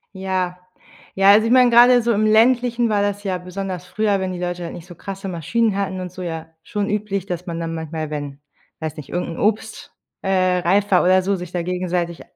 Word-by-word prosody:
Ja. 185 -1 -2 0.6
Ja, 195 +1 +6
also 215 +2 +5
ich - - 0
mein, 250 -1 +6
grade 245 +1 +7
so 235 0 +1
im 215 +1 +1
Ländlichen 235 +2 +3
war 205 -1 +2
das 205 0 -1
ja 190 -3 -1
besonders 180 0 -6
früher, 205 +1 0
wenn 190 -1 -2
die 180 - -5
Leute 175 0 -3
halt 170 - -6
nicht 175 0 -10
so 175 - -11
krasse 195 +3 -7
Maschinen 195 +5 0
hatten 190 -2 -2
und 180 -1 -6
so 185 - -9
ja, 165 -2 -5 0.2
schon 205 +4 -3
üblich, 200 -2 -2
dass 180 -2 -5
man 170 -2 -4
dann 165 0 -3
manchmal, 160 -1 -5
wenn- 145 -2 -5 0.4
weiß 155 -1 -4
nicht- 150 -3 -9
irgend 175 - -3
'n - - -6
Obst, 220 +1 -2 0.3
äh, 185 -1 +2
reifer 190 +2 +3
oder 185 +1 +4
so, 195 +2 0
sich 180 -2 -7
da 180 - -2
gegenseitig 175 -1 -2
185 Hz, 220 wpm, -21 LUFS, 175-205 Hz, 0.6 s, grade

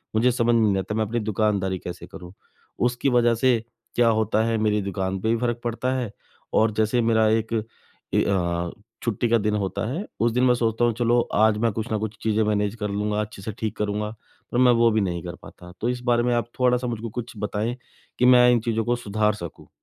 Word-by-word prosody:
मुझे 125 +3 +4
समझ 120 0 +2
में 115 - +4
नहीं 105 -3 +3
आता, 95 +3 -3
मैं 110 - +1
अपनी 115 +3 -2
दुकानदारी 105 -3 0
कैसे 90 - -8
करूँ। 90 -2 -11 0.5
उसकी 125 +3 0
वज़ह 120 -1 +3
से 125 +1 +3 0.4
क्या 120 -1 +4
होता 110 0 +1
है, 115 -1 0
मेरी 105 -1 +1
दुकान 95 -1 -3
पे 110 - 0
भी 115 - +2
फ़र्क 120 -1 -1
पड़ता 120 +2 -1
है। 120 -5 -4 0.4
और 110 0 +3
जैसे 110 +3 +2
मेरा 110 -1 +3
एक 110 +1 0 0.6
ए - - +3
अ, 85 -3 -1 0.3
छुट्टी 115 0 0
का 115 - +4
दिन 105 0 0
होता 100 -2 -2
है, 175 +10 -3
उस 115 +1 +2
दिन 125 +2 +1
मैं 125 -1 +5
सोचता 115 0 +1
हूँ 120 - +2
चलो, 120 0 +3
आज 110 0 +4
मैं 115 - +3
कुछ 110 0 -3
न 110 - +1
कुछ 110 0 -4
चीज़ें 110 0 +2
मैनेज 105 0 0
कर 105 - -2
लूँगा, 105 +1 -1
अच्छे 105 -2 -7
से 110 +3 -4
ठीक 110 -1 -2
करूँगा, 105 0 -2 0.4
पर 120 - -1
मैं 125 -1 +6
वो 115 - +6
भी 110 -1 +2
नहीं 85 -3 -2
कर 85 0 -6
पाता। 90 0 -13
तो 120 - +1
इस 125 0 -3
बारे 120 0 +3
में 125 - +1
आप 120 0 -1
थोड़ा-सा 125 0 +2
मुझ 115 -2 -3
को 115 - -4
कुछ 120 +2 -6
बताएँ 105 +3 -2 0.4
कि 125 - +4
मैं 125 -1 +7
इन 120 - +3
चीज़ों 115 -1 -1
को 120 +1 +1
सुधार 105 -2 0
सकूँ? 85 -5 -9
110 Hz, 235 wpm, -24 LUFS, 105-120 Hz, 0.6 s, मैं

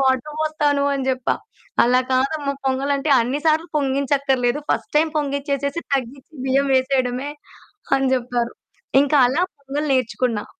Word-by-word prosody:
Water 265 +2 +1
బోస్తాను 295 -2 +1
అని 270 -1 -3
జెప్పా. 255 -1 0 0.5
"అలా 250 +1 +4
కాదమ్మా 280 +2 0
పొంగలంటే, 275 +2 0
అన్ని 255 +5 -1
సార్లు 315 +2 +2
పొంగించక్కర్లేదు, 275 -2 +1
ఫస్ట్ - - -1
టైమ్ 315 +1 +2
పొంగిచ్చేసేసి, 280 +1 -2
తగ్గిచ్చి 265 +3 -5
బియ్యం 275 +1 +2
వేసేయడమే" 260 0 0 0.7
అని 270 0 +1
జెప్పారు. 240 -1 -2 0.5
ఇంక 285 - -2 0.2
అలా 285 +7 0 0.2
పొంగల్ 280 +2 -3
నేర్చుకున్నా. 240 -3 0
275 Hz, 125 wpm, -21 LUFS, 255-285 Hz, 0.7 s, అలా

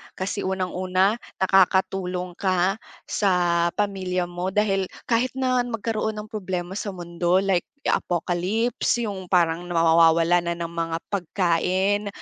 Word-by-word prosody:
Kasi 190 +2 -3
unang-una, 185 +2 0 0.2
nakakatulong 190 -1 +2
ka 190 +1 +1 0.2
sa 175 -4 +1
pamilya 190 -3 -1
mo 175 +1 -4
dahil 195 -3 +1 0.2
kahit 240 +2 0
na 255 -1 +1
magkaroon 220 -2 -2
ng 210 0 -8
problema 185 -4 -4
sa 200 -3 -5
mundo, 175 +1 0
like 190 -3 +1 0.2
ya - - +2
apocalypse, 185 +8 -1
yung 195 -4 -5
parang 175 -1 +1
na 175 - -4
mawawalan 165 +1 +4
na 170 - 0
ng 170 -1 -4
mga 165 -1 -2
pagkain, 190 +2 0
185 Hz, 130 wpm, -24 LUFS, 175-200 Hz, 0.2 s, mawawalan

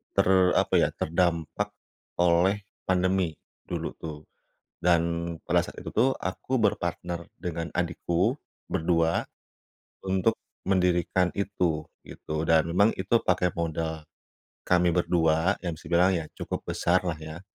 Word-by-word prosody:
ter - - +5 0.3
apa - - +3
ya, - - +4
terdampak 85 +4 -1 0.4
oleh 90 +4 +3 0.2
pandemi 95 -2 +1 0.3
dulu - - -3
tuh 75 -2 -7 0.6
dan 85 -1 +1
pada - - +1
saat - - -9
itu - - -6
tuh 130 +4 +3
aku 115 +7 -2
berpartner 85 -4 -1
dengan 85 -2 -4
adikku, 90 - 0 0.3
berdua. 85 0 +1 0.8
Untuk 95 +4 +1 0.3
mendirikan 90 -1 +2
itu 85 -6 -1 0.2
gitu 80 +1 -4
dan 80 0 +3
memang 100 +6 +4
itu 100 +5 +2
pakai 90 -1 +2
modal 80 -1 -2 0.6
kami 90 -1 +4
berdua 85 +1 +2
yang 85 - -1
bisa - - -13
dibilang 90 +2 +4
ya 80 - -7
cukup - - -4
besar 90 +2 +2
lah 85 - -1
ya. 80 +1 -8
85 Hz, 125 wpm, -27 LUFS, 80-95 Hz, 0.8 s, ter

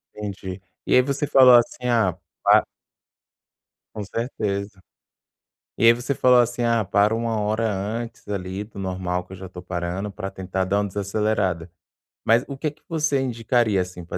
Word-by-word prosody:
Entendi. 95 -2 -6 0.2
E - - 0
aí 125 - +7
você 140 +3 -1
falou, 130 -3 +7
assim: 120 +1 +2
"Ah, 110 -8 +2 0.3
pa" - - +6 1.3
Com 105 - -4
certeza. 100 -3 -4 0.9
E - - +1
aí 115 - +9
você 120 +3 -2
falou, 125 -2 +5
assim: 120 0 +1
"Ah, 115 -2 +2
paro 105 +3 +2
1 115 -1 -1
hora 110 +2 0
antes 110 +4 -5
ali 95 -1 -4
do 105 -1 -15
normal, 90 -2 -2
que - - -12
eu - - -7
já 95 - -8
estou 90 0 -10
parando 90 +3 -3
para 95 0 -5
tentar 95 0 -3
dar 95 +2 +1
uma 105 - 0
desacelerada". 100 -3 -1 0.6
Mas 115 +2 +4
o 140 - -6
que 155 +3 -1
que 150 - -27
você 155 -4 +1
indicaria, 120 -4 +1
assim, 90 -1 -7
para 85 - -5
105 Hz, 175 wpm, -23 LUFS, 95-120 Hz, 1.3 s, aí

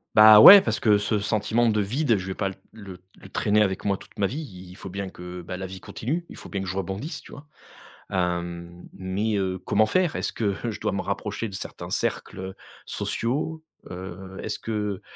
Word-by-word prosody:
Bah, 110 0 +10
ouais, 195 - +12
parce 110 -1 -1
que 105 -2 +4
ce 105 +1 0
sentiment 110 +3 +1
de 105 -1 +2
vide, 120 +2 +1
je 95 - -5
vais 95 - -4
pas 100 - -1
l 95 - -6 0.2
le 95 -4 -11 0.2
le - - -13
traîner 105 +1 +2
avec 95 -2 0
moi 100 -1 +1
toute - - -17
ma 100 - +2
vie, 135 +10 -5
i 95 - -10
il 90 - -12
faut 95 - -8
bien 100 +1 -5
que, 90 0 -9
bah, 90 +2 -6
la 95 - -5
vie 95 0 -9
continue, 160 +9 -4
il - - -11
faut - - -10
bien 100 -2 -4
que 95 - -5
je 95 - -3
rebondisse, 95 - -4
tu - - -14
vois? 145 - -11 0.6
Hem, 85 -1 -3
mais 100 +4 -2
heu, 95 -2 -1
comment 110 +4 +2
faire? 180 +6 +1
Est-ce - - -2
que, 115 - -3 0.2
heu, 115 - -1
je 105 - -7
dois 105 -2 -1
me 100 - -1
rapprocher 115 - -3
de - - -12
certains - - -7
cercles, - - -2
heu, 95 0 -6 0.3
sociaux? 155 +7 -2 0.3
Heu, 95 +1 -8
est-ce - - -4
que 105 -3 -3
100 Hz, 225 wpm, -25 LUFS, 95-110 Hz, 0.6 s, ouais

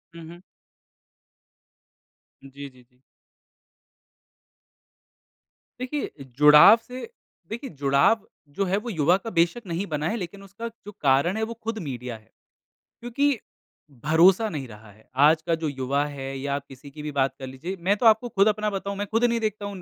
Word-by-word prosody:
हुँ, 165 -1 -10
हुँ। 175 +1 -12 2.0
जी, 140 +1 -10
जी, 130 -1 -21
जी। 125 0 -34 2.8
देखिए 270 +3 -3 0.3
जुड़ाव 150 +9 +8
से 255 - -8 0.4
देखिए 235 +5 -6
जुड़ाव 140 +9 +2 0.3
जो 195 - +1
है 190 +1 0
वो 230 +4 -5
युवा 170 -3 +3
का 225 +3 -7
बेशक़ 175 +4 0
नहीं 175 +4 -2
बना 150 -1 -2
है - - -1
लेकिन 195 +1 -7
उसका 200 +4 -8
जो 215 -2 -12
कारण 140 +8 +2
है, 220 - -1
वो 230 +1 -3
खुद 225 0 -5
मीडिया 125 -5 -6
है। 110 - -25 0.7
क्योंकि 260 +3 0 0.7
भरोसा 180 +8 +5
नहीं 140 -6 -5
रहा 105 -1 -14
है। 110 +2 -23
आज 150 +4 +5
का 165 - +2
जो 160 -1 -3
युवा 140 +1 -1
है 135 -2 -6
या 140 +1 -2
किसी 135 0 -14
की 150 - -10
भी 150 - -4
बात 135 -1 0
कर 130 - -6
लीजिए 145 +9 -6
मैं 190 +4 +2
तो 235 - -2
आपको 225 +2 +5
खुद 200 -1 +3
अपना 215 0 +1
बताऊँ 200 0 -4
मैं 205 - -3
खुद 225 +2 +1
नहीं 235 -1 +1
देखता 215 -2 -3
हूँ। 200 0 -6
न 180 - -10
170 Hz, 175 wpm, -25 LUFS, 140-215 Hz, 2.8 s, जुड़ाव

